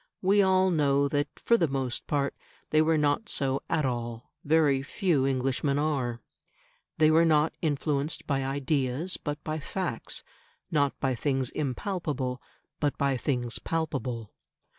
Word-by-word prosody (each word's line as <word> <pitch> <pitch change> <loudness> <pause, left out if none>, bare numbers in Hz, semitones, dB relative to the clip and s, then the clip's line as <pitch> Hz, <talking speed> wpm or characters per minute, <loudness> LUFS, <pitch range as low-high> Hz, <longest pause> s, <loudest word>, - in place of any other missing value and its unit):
We 200 +2 +5
all 190 -1 +4
know 140 -3 +3
that, 145 0 0
for 235 - +3
the 165 - +2
most 135 -3 -2
part, 140 -1 0 0.4
they 155 - +5
were 160 0 +3
not 150 +8 +1
so 135 -1 0
at 155 - +1
all; 120 -2 -4
very 145 -3 +3
few 140 -1 +1
Englishmen 135 +1 0
are. 135 -6 -1 0.8
They 155 0 +5
were 165 +1 +5
not 155 -1 +3
influenced 150 -1 0
by 135 -2 0
ideas, 140 +4 -1
but 145 -1 -4
by 155 0 -3
facts; 170 -5 -3 0.5
not 145 -3 +1
by 135 -1 +1
things 130 +1 -1
impalpable, 145 -3 -2 0.4
but 145 -2 0
by 140 -1 +1
things 125 -2 -2
palpable. 135 -9 -3
145 Hz, 140 wpm, -28 LUFS, 135-155 Hz, 0.8 s, We